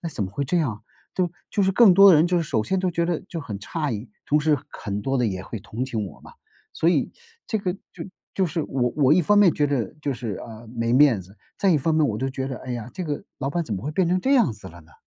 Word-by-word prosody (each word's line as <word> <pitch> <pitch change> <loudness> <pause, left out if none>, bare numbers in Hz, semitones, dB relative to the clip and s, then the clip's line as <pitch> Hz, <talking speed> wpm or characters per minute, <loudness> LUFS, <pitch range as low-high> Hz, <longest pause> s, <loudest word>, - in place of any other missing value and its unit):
哎， 170 - -3
怎 110 -9 -2
么 95 - -6
会 140 - -3
这 175 +7 0
样？ 115 -10 -2 0.3
对 185 - +1
吧， 170 - -9 0.2
就 205 - +1
是 190 - +3
更 210 -2 +7
多 195 +2 +9
的 170 - +7
人 155 +3 +4
就 180 0 +1
是 170 - 0
首 110 -8 -1
先 190 +7 0
都 185 -1 0
觉 170 0 0
得 170 -2 -1
就 165 -3 -5
很 105 -8 -6
诧 150 +6 -3
异， 105 +2 -5 0.2
同 150 +1 +3
时 150 -1 +3
很 100 -1 -5
多 135 +2 0
的 120 - +2
也 95 -3 -3
会 110 - -6
同 115 +4 -4
情 110 -6 -3
我 80 - -12
嘛。 - - -14 0.4
所 165 - +1
以 160 -6 +2 0.4
这 220 - -1
个 185 -2 -2 0.2
就 - - -8 0.3
就 190 - +2
是 160 0 -2
我 125 -4 -1
我 140 -1 +4
一 180 - +4
方 205 +5 +4
面 195 -5 +6
觉 145 - +2
着 140 -2 -2
就 140 - 0
是， 115 -5 -4
呃， 115 0 -11
没 115 0 -2
面 130 -6 +5
子， 95 +4 -18 0.2
再 195 - +3
一 165 - +4
方 160 +4 0
面 155 -2 +3
我 105 - -2
就 135 - -1
觉 135 0 -4
着， 130 - -4
哎 130 - -8
呀， 120 0 -5
这 185 - -5
个 150 -3 -3 0.2
老 135 - -2
板 170 +3 -1
怎 105 - -3
么 95 - -5
会 150 - -2
变 175 +3 +1
成 185 +1 +2
这 270 +8 +2
样 230 - +4
子 100 -3 -10
了 85 +1 -13
呢？ 80 - -22
140 Hz, 320 characters per minute, -24 LUFS, 115-170 Hz, 0.4 s, 多